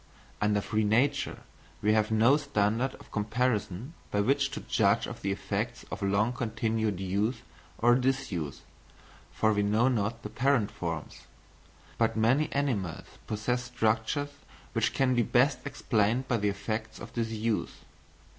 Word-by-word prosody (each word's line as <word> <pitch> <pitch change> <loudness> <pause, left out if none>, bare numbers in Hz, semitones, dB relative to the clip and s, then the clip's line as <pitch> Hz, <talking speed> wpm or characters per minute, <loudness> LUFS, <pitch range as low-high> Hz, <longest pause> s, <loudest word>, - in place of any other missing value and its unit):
Under 105 -1 +2
free 110 +2 0
nature 115 +7 +1 0.4
we 105 +1 +4
have 110 -1 +2
no 110 +5 +5
standard 125 -3 0
of - - -16
comparison 110 - -1 0.2
by 100 - 0
which 130 +7 +2
to - - -6
judge - - +2
of - - -8
the 100 - -1
effects 100 - -3
of - - -5
long 100 +4 +2
continued 110 -4 -1
use 100 +5 -1 0.3
or 120 +1 +5
disuse, 125 - -1 0.7
for 110 0 +2
we 105 - +1
know 110 +5 +3
not 115 -1 -1
the - - -5
parent 125 -5 +2
forms; 85 -6 -5 0.7
but - - +2
many 130 +8 +3
animals 110 - -1 0.2
possess 125 +4 -1
structures 120 +4 0 0.4
which 115 -1 +1
can 135 -2 +3
be 120 - +3
best 125 +4 +3
explained 115 0 +1
by 120 - +2
the 105 -1 +1
effects 110 +2 -4
of - - -10
disuse. 115 -1 -1
110 Hz, 145 wpm, -29 LUFS, 105-125 Hz, 0.7 s, no